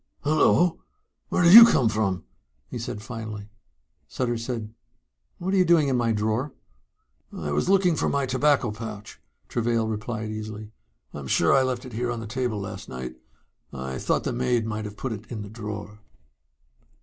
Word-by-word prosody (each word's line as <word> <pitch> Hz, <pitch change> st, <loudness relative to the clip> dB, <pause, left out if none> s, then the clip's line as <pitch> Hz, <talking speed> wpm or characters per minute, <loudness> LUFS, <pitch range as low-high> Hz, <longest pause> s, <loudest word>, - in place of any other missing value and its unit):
"Hullo. 160 Hz, +3 st, +3 dB, 0.5 s
Where 180 Hz, -, +1 dB
did 170 Hz, +1 st, +7 dB
you 230 Hz, +2 st, +14 dB
come 135 Hz, -, +4 dB
from?" 105 Hz, -4 st, 0 dB, 0.5 s
he 120 Hz, -, -4 dB
said 115 Hz, -3 st, -5 dB
finally. 110 Hz, -3 st, -7 dB, 0.6 s
Sutter 120 Hz, -2 st, -2 dB
said, 115 Hz, -2 st, -5 dB, 0.6 s
"What 185 Hz, +2 st, -3 dB
are -, -, +3 dB
you 185 Hz, -, +6 dB
doing 165 Hz, -5 st, +4 dB
in 130 Hz, -, +1 dB
my 120 Hz, -2 st, +1 dB
drawer?" 110 Hz, +6 st, -1 dB, 0.8 s
"I 75 Hz, -2 st, -5 dB
was 75 Hz, -, 0 dB
looking 190 Hz, -3 st, +4 dB
for -, -, 0 dB
my 140 Hz, -1 st, 0 dB
tobacco 130 Hz, -2 st, +2 dB
pouch," 105 Hz, -1 st, -8 dB, 0.3 s
Travail 115 Hz, -1 st, 0 dB
replied 110 Hz, 0 st, -4 dB
easily. 110 Hz, 0 st, -7 dB, 0.4 s
"I'm 70 Hz, -2 st, -7 dB
sure 85 Hz, -, +3 dB
I 135 Hz, -, +5 dB
left 130 Hz, -1 st, -2 dB
it 125 Hz, -, -10 dB
here 120 Hz, +2 st, -2 dB
on 120 Hz, -1 st, -3 dB
the 115 Hz, -, -6 dB
table 120 Hz, -1 st, -2 dB
last 100 Hz, -, -7 dB
night. 65 Hz, 0 st, -7 dB, 0.5 s
I 65 Hz, 0 st, -5 dB
thought -, -, 0 dB
the -, -, -2 dB
maid 120 Hz, -2 st, 0 dB
might 110 Hz, -1 st, -4 dB
have 105 Hz, 0 st, -8 dB
put 130 Hz, -, -4 dB
it 110 Hz, +1 st, -10 dB
in 110 Hz, -3 st, -4 dB
the 100 Hz, -, -9 dB
drawer." 105 Hz, -1 st, -7 dB
115 Hz, 175 wpm, -25 LUFS, 105-130 Hz, 0.8 s, you